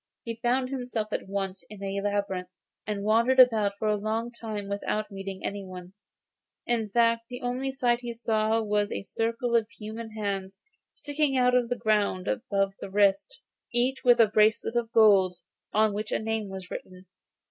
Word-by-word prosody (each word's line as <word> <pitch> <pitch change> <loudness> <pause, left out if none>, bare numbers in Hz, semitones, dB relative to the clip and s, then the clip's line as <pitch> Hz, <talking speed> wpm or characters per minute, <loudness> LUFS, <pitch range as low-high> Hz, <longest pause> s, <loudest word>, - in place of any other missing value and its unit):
He 230 -1 -5
found 255 +1 +1
himself 245 -5 -3
at - - -3
once 195 -1 -3
in 205 -2 -10
a 195 0 -2
labyrinth, 200 -3 -2 0.4
and 205 -2 -2
wandered 230 +5 +3
about 220 -5 +6
for 215 - -2
a 210 - +3
long 220 +3 -2
time 220 -4 -6
without 205 +1 -2
meeting 195 -1 -6
anyone; 185 -2 -6 0.7
in 230 -3 0
fact, 230 +1 +2
the 245 0 -7
only 250 +2 -1
sight 245 -3 +1
he 240 -1 -5
saw 225 -1 0
was 205 -1 0
a - - -3
circle 230 +3 -1
of 225 -1 +2
human 220 +1 -8
hands, 195 -2 -3 0.3
sticking 290 -2 -1
out 250 0 +4
of 245 -2 +2
the 245 - -1
ground 205 -4 +1
above 200 -6 0
the - - -7
wrist, 200 - +2 0.3
each 250 +2 0
with 245 -1 +5
a 230 - +8
bracelet 215 +2 +2
of 235 -1 0
gold, 200 -5 +5 0.3
on 215 -1 +3
which 215 +3 -4
a - - +2
name 220 -2 -2
was 190 -1 -8
written. 185 0 -8
215 Hz, 175 wpm, -27 LUFS, 200-240 Hz, 0.7 s, a